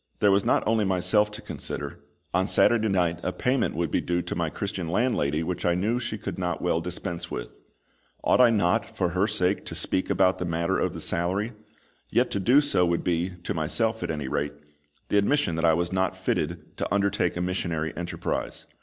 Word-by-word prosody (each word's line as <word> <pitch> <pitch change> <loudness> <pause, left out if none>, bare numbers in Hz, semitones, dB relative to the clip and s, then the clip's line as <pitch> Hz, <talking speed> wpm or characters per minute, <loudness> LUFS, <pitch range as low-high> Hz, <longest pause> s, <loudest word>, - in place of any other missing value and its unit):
There 105 - +5
was 100 0 +3
not - - +2
only 110 0 +2
myself 95 +2 +2
to 105 +2 -8
consider; 70 -2 -6 0.3
on 95 +2 +2
Saturday 110 +1 +4
night 90 -3 +1
a - - -1
payment 130 - 0
would 85 0 -1
be - - +1
due 90 0 -1
to - - -4
my 85 -2 0
Christian 95 -2 -4
landlady 80 - +1
which 90 +2 -3
I 85 - +2
knew 110 +7 0
she 110 -3 -4
could 100 -3 -5
not 90 -3 -1
well 80 - 0
dispense 85 0 -5
with. - - -6 0.6
Ought - - +4
I 125 - +7
not, 105 0 +2
for 90 -4 +1
her 95 +4 +1
sake, 90 -2 +1
to - - -5
speak 95 - 0
about 95 -1 +3
the - - -1
matter 85 0 0
of - - -1
the - - -5
salary? 95 +7 0 0.6
Yet - - +2
to 100 - -1
do 125 +10 +5
so 145 -11 +2
would 85 -1 +1
be, 90 +1 0
to - - -2
myself 85 +9 0
at - - -3
any 75 -4 -3
rate, 70 +2 -1 0.6
the 105 - +4
admission 140 - +2
that 80 - +1
I 80 -1 +5
was 85 +2 -1
not 95 0 0
fitted 80 0 -2
to - - -3
undertake 100 -1 +1
a - - -1
missionary 85 -3 -2
enterprise. 85 0 -4
90 Hz, 205 wpm, -26 LUFS, 85-105 Hz, 0.6 s, I